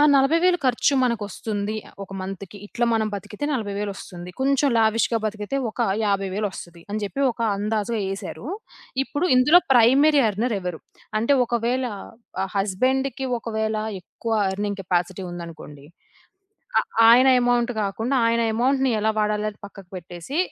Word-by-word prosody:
ఆ - - +6
40,000 330 +7 +4
ఖర్చు 255 +3 +2
మనకొస్తుంది. 215 -2 -2 0.3
ఒక 195 - -22
మంత్‌కి. 195 +1 -7
ఇట్లా 240 +3 -1
మనం 220 -1 +1
బతికితే 210 +7 -6
నలభై 215 -7 -2
వేలొస్తుంది, 190 -3 -6
కొంచెం 275 +1 +3
లావిష్‌‌గా 225 +1 +2
బతికితే, 215 +4 -3
ఒక 230 - -8 0.2
యాభై 195 -1 0
వేలొస్తది. 190 -4 -5
అని 215 - -2
చెప్పి 205 +7 -4
ఒక 230 - -15 0.2
అందాజుగా 215 +2 -1
యేశారు. 195 +5 -6 0.6
ఇప్పుడు 290 +5 -2
ఇందులో 295 +7 +7
ప్రైమరీ 270 +5 +5
ఎర్నర్ 220 +4 -1
ఎవరు, 180 -3 -4 0.4
అంటే 255 +6 +3
ఒకవేళ 240 +2 0 0.6
ఆహ్, 195 - -7
హస్బెండ్‌కి 260 +7 0
ఒకవేళ 220 -1 -2 0.3
ఎక్కువ 225 +5 -6 0.2
ఎర్నింగ్ 205 +1 -3
కెపాసిటీ 180 +1 -1
ఉందనుకోండి. 165 -4 -9 0.9
ఆ - - +6 0.3
ఆయన 250 +3 +7
అమౌంట్ 245 0 +2
కాకుండా, 225 +7 -1
ఆయన 230 0 +2
అమౌంట్‌ని 265 +2 +2
ఎలా 220 +1 +2
వాడాలి 210 0 0
అని 205 - -19
పక్కకు 195 -2 -14
పెట్టేసి, 175 - -6
220 Hz, 135 wpm, -23 LUFS, 195-250 Hz, 0.9 s, ఇందులో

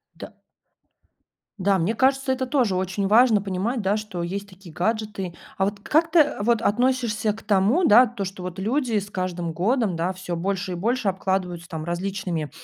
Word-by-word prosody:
Да. - - -9 1.3
Да, 195 0 +2
мне 180 +5 0
кажется, 270 +2 +2
это 260 0 -1
тоже 245 -7 +1
очень 190 +2 -1
важно 220 0 +5
понимать, 200 +5 -2
да, 200 +2 +1
что 210 -5 -5
есть 200 +4 -4
такие 185 -3 -14
гаджеты. 210 -2 -2 0.2
А 190 - +2
вот 200 0 -3
как 320 +8 +2
ты, 335 - +5
э, 295 -8 +2
вот 230 +1 +2
относишься 230 -2 +1
к 220 - -12
тому, 210 - +2
да, 235 +5 +7
то, 230 -3 -5
что 190 -1 -6
вот 180 +1 -6
люди 235 +2 0
с 200 0 -3
каждым 180 -3 -3
годом, 200 +2 0
да, 175 +3 -1
всё 180 -2 -5
больше 190 +2 -2
и - - -3
больше 225 +4 0
обкладываются 185 -2 -2
там 160 -2 -6
различными, 175 -2 -3
200 Hz, 185 wpm, -24 LUFS, 185-230 Hz, 1.3 s, да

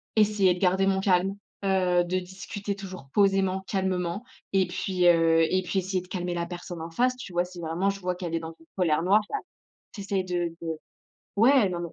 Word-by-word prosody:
essayer 205 -4 +4
de 180 - -7
garder 190 +1 +3
mon 190 0 +2
calme, 190 0 +2 0.3
heu, 180 -2 +3
de 185 +1 -1
discuter 195 +2 -6
toujours 185 -7 -9
posément, 195 -1 +2
calmement 190 +1 -1 0.3
et 190 -2 +3
puis, 180 0 -1
heu, 165 -1 +5
et 185 - +2
puis 190 +1 0
essayer 185 0 -1
de 180 - -15
calmer 180 -1 -3
la 170 0 -2
personne 175 -1 -7
en 165 - -5
face, 250 +7 +2
tu 205 -7 -9
vois? 175 +1 +2
Si 180 -1 -11
vraiment 170 +4 0
je 200 0 -3
vois 180 -1 -2
qu'elle 175 -2 -5
est - - 0
dans 165 0 -7
une 165 - -19
colère 165 -3 +2
noire, 205 +4 +5
bah, - - -2 0.6
tu 205 - -8
essaies 195 -1 -1
de 175 -2 -2
de 165 - -4 0.7
ouais, 230 -1 +5
non, 175 -1 -3
non. 170 -1 -5
185 Hz, 215 wpm, -27 LUFS, 175-195 Hz, 0.7 s, heu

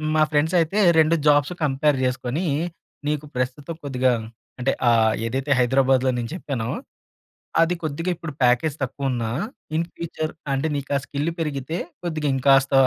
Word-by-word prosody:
మా 155 - +4
ఫ్రెండ్స్ 155 +4 +2
అయితే 170 +6 +1 0.2
2 160 +1 +5
jobs 145 +3 +4
compare 145 0 +2
జేసుకొనీ, 130 +6 -1 0.6
నీకు 150 0 -1
ప్రస్తుతం 130 +5 -3
కొద్దిగా 130 -2 +1 0.5
అంటే 130 +2 +2 0.2
ఆహ్, 110 -2 +4
ఏదైతే 135 +5 -2
హైదరాబాద్లో 130 +1 +3
నేను 120 -1 -3
చెప్పానో. 130 -10 -3 0.9
అది 165 +2 +2
కొద్దిగా 160 +3 -2
ఇప్పుడు 160 -1 -6
ప్యాకేజ్ 125 +5 +3
తక్కువ 135 +1 -2
ఉన్నా, 115 -2 -2 0.5
ఇన్ 165 +1 0
ఫ్యూచర్ 160 -2 -4 0.2
అంటే 135 +4 0
నీకు 140 0 -4
ఆ - - +3
స్కిల్ 145 +3 -2
పెరిగితే 150 +1 -2 0.2
కొద్దిగా 155 -4 -2
ఇంకాస్త 135 +1 +4
140 Hz, 145 wpm, -23 LUFS, 130-155 Hz, 0.9 s, 2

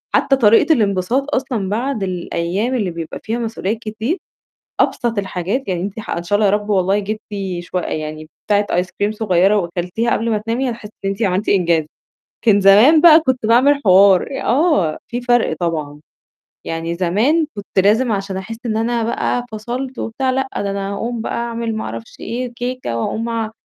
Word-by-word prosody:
حتّى 270 - +3
طريقة 230 +6 +5
الانبساط 225 +6 0
أصلًا 245 -7 -2
بعد 235 0 -2
الأيام 185 +5 -2
اللي 200 -7 -1
بيبقى 165 -1 -6
فيها 230 +2 -2
مسؤوليات 225 -2 -2
كتير، 225 - -3 0.6
أبسط 235 -3 0
الحاجات 195 +6 -2
يعني 180 -2 -1
أنتِ 200 +3 -5
ح - - -9
إن 170 - -2
شاء 205 +4 0
الله 210 - +3
يا 195 - +3
رب 210 0 -4
والله 195 +1 +2
جِبتِ 215 +2 -4 0.4
شو 175 +1 -5
يعني 155 -1 -5 0.2
بتاعة 205 0 +2
ايس 180 +1 0
كريم 205 +1 -1
صغيرة 200 -2 +2
وأكلتيها 180 +5 -2
قبل 230 +1 0
ما 215 - +2
تنامي 230 +5 -2
هتحسّي 230 -3 -7 0.2
إن - - +1
أنت 195 +3 -2
عملتِ 190 +2 0
إنجاز. 170 -5 +2 0.6
كان 205 -3 +5
زمان 220 +11 +7
بقى 330 -1 +9
كنت 260 -6 -1
باعمل 275 +5 +4
حوار، 190 0 +6 0.2
آه، 245 - +2
في 245 +1 -4
فرق 240 -9 +2
طبعًا. 155 -4 -3 0.6
يعني 165 +1 -3
زمان 220 - +1
كنت 200 -1 -5
لازم 225 +3 +3
عشان 195 -1 -3
أحس 195 +4 -6
إن 220 -1 -1
أنا 230 +1 0
بقى 245 +1 -1
فصلت 245 +4 -5
وبتاع 260 +3 -1
لأ، 265 +1 -1
ده 200 -1 -1
أنا 195 0 -3
هاقوم 230 +3 -3
بقى - - -3
أعمل 235 -1 -3
ما - - -3
أعرفش 115 +1 -8
إيه 245 +1 -4
كيكة 245 - -4
وأقوم 225 - -2
أ 225 -2 -2
215 Hz, 180 wpm, -18 LUFS, 185-240 Hz, 0.6 s, بقى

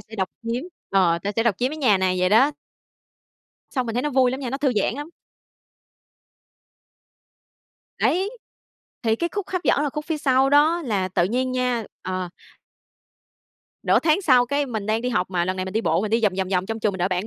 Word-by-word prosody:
sẽ 220 - -13
độc 190 -2 -1
chiếm 230 +2 -2 0.3
ờ, 180 -4 +3
ta 205 +1 -2
sẽ 225 - +3
độc 235 -4 +2
chiếm 250 +2 0
cái 310 - -6
nhà 235 -10 +3
này" 185 -1 +1
vậy 180 - +3
đó. 235 +8 +5 1.2
Xong 255 -3 -2
mình 225 - -4
thấy 245 - 0
nó 295 - -1
vui 260 -1 +3
lắm 260 +2 -4
nha, 255 -3 -4
nó 270 - -2
thư 280 -3 +1
giãn 210 - +1
lắm. 290 +3 -6 2.9
Đấy, 380 +4 +1 0.7
thì 225 -1 +1
cái 340 +7 -1
khúc 405 -2 -4
hấp 365 -2 -2
dẫn 285 - +3
là 295 - -1
khúc 300 +2 -5
phía 320 -2 -2
sau 265 -1 +3
đó 310 +4 +4
là 200 -7 -1
tự 175 -1 +1
nhiên 255 +5 -1
nha 250 -2 0 0.2
ờ. 185 -1 -3 1.5
Nửa - - +4
tháng 325 +4 +2
sau 255 -7 +4
cái 285 +3 0
mình 220 -5 -4
đang 220 +1 +1
đi 250 - -1
học 185 -7 -1
mà, 175 -2 0
lần 185 +1 -2
này 185 - -2
mình 190 - -6
đi 220 - +1
bộ 165 -5 +1
mình 215 - -2
đi 230 +1 +2
vòng, 210 -3 +3
vòng, 190 - -1
vòng 185 -1 0
trong 225 +1 -4
trường 210 -1 +1
mình 190 - -6
đợi 180 +1 +1
bạn 185 +2 -2
230 Hz, 220 wpm, -23 LUFS, 190-270 Hz, 2.9 s, đó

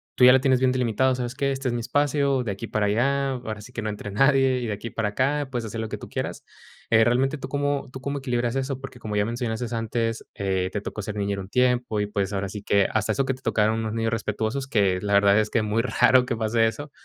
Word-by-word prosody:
tú - - +2
ya 125 - +10
la 130 - +5
tienes 130 -1 +3
bien 130 0 +3
delimitado, 125 +1 +1
¿sabes 125 0 -4
qué? 140 +1 0
Este 135 0 -3
es 120 - 0
mi 120 - -2
espacio, 140 0 +1
de 110 - -2
aquí 100 +4 -6
para 105 -1 0
allá, 135 +6 +1
ahora 120 -5 -5
sí 125 +4 -13
que 120 - -4
no 110 - -2
entre 105 0 -6
nadie, 135 +3 +3
y 120 - -3
de - - -2
aquí 105 +3 -6
para 110 -2 -1
acá, 140 +6 0
puedes 120 -2 -3
hacer 110 +1 -4
lo 110 - -4
que - - -4
tú - - -10
quieras. - - -5 0.4
Eh, 110 0 +5
realmente, 130 +5 +2
¿tú 135 -1 -7
cómo 145 0 -1
tú 130 - -8
cómo 140 +1 -3
equilibras 120 -2 -1
eso? 135 0 -2
Porque 135 -2 -9
como 105 -2 -4
ya 105 - +2
mencionaste 115 0 -3
antes, 115 0 -2
eh, 95 -2 -1
te 105 - -2
tocó 110 - -5
ser 105 +1 -5
niñera 100 -1 -1
un 95 - -10
tiempo 125 -2 +1
y, 105 - +1
pues, 100 -1 -2
ahora 100 -1 -2
sí 105 +1 -7
que 100 -1 +3
hasta 110 -1 +1
eso 135 - 0
que 135 - 0
te 130 - -12
tocaron 110 -1 +1
unos 110 -1 -3
niños 115 0 -1
respetuosos, 110 +4 -2
que 100 -7 +2
la 100 0 -1
verdad 100 0 +5
es 110 0 +2
que 115 - +1
muy 105 +2 +1
raro 125 +1 +4
que 120 - -2
pase 115 +1 +2
eso. 145 +6 -5
115 Hz, 270 wpm, -25 LUFS, 105-130 Hz, 0.4 s, ya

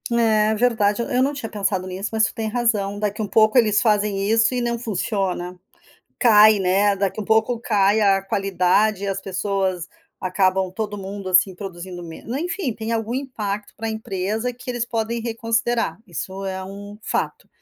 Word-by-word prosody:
É 220 -2 +3
verdade, 220 -2 +2
eu 235 - -4
eu 250 -2 +2
não 275 - +1
tinha 270 -6 -5
pensado 195 -3 -1
nisso, 190 +3 -4
mas 220 0 +3
tu - - -4
tem 220 -1 -3
razão. 215 -4 0
Daqui 210 +1 -2
um 210 - -2
pouco 215 +4 +4
eles 215 -4 +4
fazem 210 -3 +1
isso 225 +3 +3
e 250 - 0
não 235 0 -1
funciona. 190 -4 -2 0.6
Cai, 215 -3 +7
né. 195 +2 +2
Daqui 195 +2 -1
um - - -4
pouco, 220 +3 +2
cai 205 -2 +2
a 195 -2 +4
qualidade 195 +1 +1
e - - -2
as 195 -1 -2
pessoas 190 -2 -2 0.3
acabam 185 0 +1
todo 205 +1 -4
mundo 195 0 -6
assim 185 +1 +4
produzindo 180 -2 -7
meno 170 +9 -7
enfim, 340 -2 -2
tem 220 +1 -5
algum 225 0 -1
impacto 210 -7 -4
para 225 - -4
a - - -1
empresa 220 +2 -2
que 250 +2 -14
eles 240 -2 -1
podem 230 0 -2
reconsiderar. 230 0 -1
Isso 190 +2 -6
é 190 -1 -3
um 205 +2 -9
fato. - - -3
210 Hz, 180 wpm, -22 LUFS, 195-225 Hz, 0.6 s, Cai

